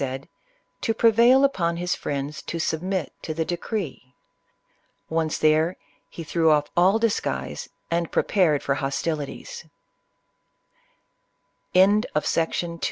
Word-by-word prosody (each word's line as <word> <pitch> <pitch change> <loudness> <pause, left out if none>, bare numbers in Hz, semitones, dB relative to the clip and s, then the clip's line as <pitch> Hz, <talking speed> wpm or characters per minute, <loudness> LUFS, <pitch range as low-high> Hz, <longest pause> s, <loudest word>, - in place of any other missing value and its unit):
25 130 -2 -1
said, 140 - -22 0.5
to 225 - 0
prevail 235 +4 +5
upon 170 -11 +1
his 180 +1 -1
friends 145 +1 -4
to 170 - -5
submit 165 +1 -2
to 155 - -5
the 160 0 -1
decree. 170 - -5 1.0
Once 160 -1 0
there, 155 +3 +2 0.3
he 165 - -8
threw 165 0 +2
off 150 -1 +2
all 185 +5 +4
disguise, 225 -1 -2 0.2
and 170 -1 0
prepared 165 -8 +2
for 140 - +1
hostilities. 150 - -4
165 Hz, 105 wpm, -24 LUFS, 150-195 Hz, 1.0 s, prevail